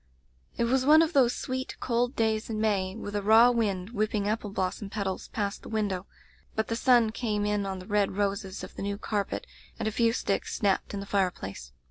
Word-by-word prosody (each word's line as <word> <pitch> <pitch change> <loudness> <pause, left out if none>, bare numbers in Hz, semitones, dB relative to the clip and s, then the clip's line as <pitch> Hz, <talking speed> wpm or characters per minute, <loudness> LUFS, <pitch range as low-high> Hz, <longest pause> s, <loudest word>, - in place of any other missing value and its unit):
"It - - +1
was 255 +2 +2
one 310 +4 +7
of 325 +1 -2
those 250 -4 +4
sweet, 260 0 -4
cold 245 +1 0
days 220 0 0
in 215 -1 -2
May, 195 -3 0
with 205 -2 -6
a 205 - 0
raw 225 +4 +7
wind 205 -4 -1
whipping 215 -2 0
apple 215 0 -1
blos 185 -2 -1
som 205 - -7
petals 200 -2 -3
past 205 -2 -3
the - - -10
window; 200 -4 -1 0.5
but 220 - -1
the 230 - 0
sun 240 -2 +4
came 215 -3 -1
in 205 -1 0
on 190 -1 -3
the 185 - -9
red 205 -1 0
roses 195 -1 -2
of - - -8
the - - -6
new 200 0 -2
carpet, 205 -1 -2 0.3
and - - -2
a - - 0
few 230 +1 +3
sticks 200 -3 -1
snapped 200 0 0
in 200 - -3
the - - -6
fireplace. 180 - -2
210 Hz, 215 wpm, -28 LUFS, 200-230 Hz, 0.5 s, one